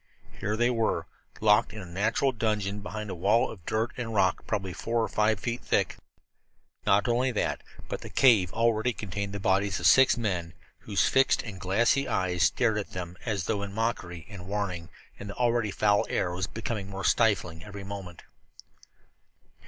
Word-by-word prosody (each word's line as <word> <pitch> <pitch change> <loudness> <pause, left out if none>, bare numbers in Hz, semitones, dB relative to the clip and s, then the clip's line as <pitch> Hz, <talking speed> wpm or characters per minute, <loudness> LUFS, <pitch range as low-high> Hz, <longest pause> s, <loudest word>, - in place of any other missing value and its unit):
Here 105 +1 -1
they 120 +2 +3
were, 115 -2 0 0.4
locked 110 +1 +4
in 110 - -7
a 95 - -7
natural 105 +9 +1
dungeon 105 -4 -1
behind 105 0 -6
a - - -3
wall 100 +7 +2
of 95 -6 -11
dirt 110 +2 0
and 115 -3 -4
rock 95 -2 +1
probably 95 -4 -2
four 115 +4 -1
or - - 0
five 105 -1 +1
feet 115 +5 -3
thick. - - 0 0.9
Not 100 +1 +4
only 125 +2 +2
that, 105 - -1 0.3
but - - -4
the - - -8
cave 110 -9 +4
already 115 +1 +1
contained 100 0 -4
the 100 - -5
bodies 95 0 +1
of - - -4
six 130 -1 +6
men 90 -7 -2 0.2
whose 100 -2 +1
fixed 135 0 +3
and 100 -6 -8
glassy 120 +8 +2
eyes 95 -6 0
stared 110 +1 +3
at 100 - -7
them 90 -1 -5
as 105 -5 -1
though 100 +3 -1
in 100 -1 -5
mockery 95 -7 -2
and 95 -4 -10
warning, 95 -5 -3 0.3
and 100 - -7
the 100 - -6
already 120 -3 +1
foul 105 +1 +2
air 90 - 0
was 90 -1 -2
becoming 110 -4 -4
more 100 0 -5
stifling 90 -8 +2
every 100 -1 -8
moment. 95 -3 -8
105 Hz, 180 wpm, -28 LUFS, 95-115 Hz, 0.9 s, six